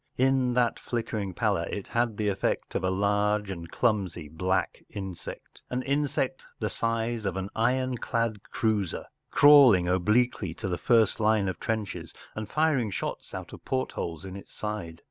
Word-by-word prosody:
In 130 -1 +3
that 120 -2 +2
flickering 110 -5 -3
pallor 100 -6 +1
it 100 - -5
had 120 -3 0
the 105 - 0
effect 95 -1 -1
of - - -1
a 95 - +2
large 105 +1 +1
and 85 -2 -7
clumsy 95 -9 0
black 90 +4 -1
insect 95 -3 -8
an 125 +1 -2
insect 145 - 0
the - - -2
size 115 0 -1
of 95 -2 -2
an 95 +2 -4
ironclad 115 -3 0
cruiser, 105 -5 0 0.2
crawling 135 -11 +7
obliquely 95 0 +2
to - - -4
the 90 -2 -2
first 115 -4 +3
line 110 -2 +3
of 95 -3 -3
trenches 110 -3 -3 0.2
and 110 -1 -5
firing 150 -8 +2
shots 95 - -4
out - - -7
of - - -11
portholes 95 -9 -3
in 95 0 -7
its 100 - -11
back. 105 -6 -4
105 Hz, 160 wpm, -28 LUFS, 95-120 Hz, 0.2 s, crawling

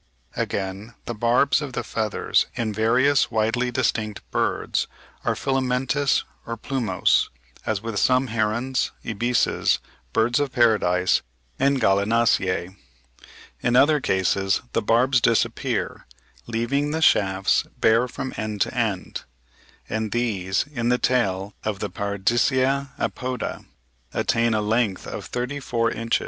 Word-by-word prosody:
W. - - -20
Wood).] - - +3
Again, 100 +4 -4
the 120 - -3
barbs 120 +6 +2
of 140 -4 -5
the 120 - -2
feathers 110 -1 0
in 115 -3 -2
various 125 +6 +3
widely 115 +2 0
distinct 110 -4 -1
birds - - 0 0.4
are - - 0
filamentous 135 +1 +1 0.2
or 115 0 -5
plumose, 120 -2 +1 0.4
as 105 -2 -1
with 115 -3 -2
some 130 +1 +3
herons, 115 +4 0 0.2
ibises, 120 +3 +1 0.3
birds 120 - +2
of 145 -2 -1
paradise, 105 -8 +3 0.4
and 140 0 +3
Gallinaceae. 100 -3 +2 0.9
In 120 0 +1
other 145 +4 +5
cases 95 0 +1
the - - +1
barbs 125 +4 +3
disappear, 115 -1 0 0.4
leaving 120 +6 0
the 160 +2 -1
shafts 95 -6 +3
bare 115 +3 +4
from 130 +1 -5
end 110 -2 -3
to - - +1
end; 110 -6 -2 0.6
and 110 -1 -2
these 100 -6 0
in 120 -2 -1
the 125 - +3
tail 100 -6 0
of 105 -2 -2
the - - -4
Paradisea 120 +7 +1
apoda 125 -2 -3 0.5
attain 115 -1 +2
a 105 - +1
length 110 -2 0
of - - -6
thirty 125 +4 -3
four 115 -3 0
inches 115 0 -1
(71. - - +2
115 Hz, 130 wpm, -23 LUFS, 105-125 Hz, 0.9 s, other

